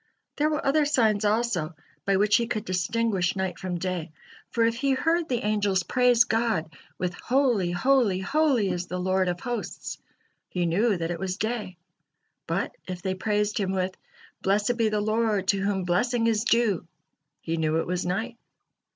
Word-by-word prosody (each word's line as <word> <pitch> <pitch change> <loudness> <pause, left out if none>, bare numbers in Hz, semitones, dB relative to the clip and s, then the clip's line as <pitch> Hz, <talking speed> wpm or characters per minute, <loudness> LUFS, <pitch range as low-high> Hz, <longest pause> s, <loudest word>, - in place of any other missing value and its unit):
There 300 +1 +2
were 300 -1 -2
other 295 +3 +3
signs 225 -8 +2
also 205 -7 0 0.3
by 195 -1 +3
which 205 +2 +4
he 235 -1 -1
could 215 -2 -3
distinguish 195 0 0
night 190 -1 -2
from 180 -1 -3
day; 175 -3 -3 0.4
for 230 -1 +2
if 230 0 +1
he 275 +2 +1
heard 330 +4 +1
the 245 -2 -1
angels 205 -3 +1
praise 245 +1 +4
God 225 -9 0 0.2
with 180 -1 -2
"Holy, 245 -6 +1
holy, 210 +2 +2
holy, 250 +1 +2
is 180 0 -3
the 180 - -4
Lord 185 +1 +1
of 175 0 -2
hosts," 240 -1 -5 0.5
he 180 -1 -1
knew 200 +5 +2
that 165 0 -2
it 170 - -4
was 185 0 -3
day; 215 -5 -3 0.7
but - - -2
if 180 -1 -6
they 190 -1 0
praised 210 +3 0
Him 190 -2 -1
with 185 0 -1 0.5
"Blessed 205 +5 +1
be 225 -2 +2
the 210 0 0
Lord 215 -2 0
to 200 - +3
whom 195 -1 0
blessing 230 +7 +1
is 225 0 +1
due," 220 -8 +2 0.5
he 165 +1 -3
knew 160 0 +1
it - - -1
was 180 0 -2
night. 220 +7 -2
205 Hz, 175 wpm, -26 LUFS, 185-235 Hz, 0.7 s, which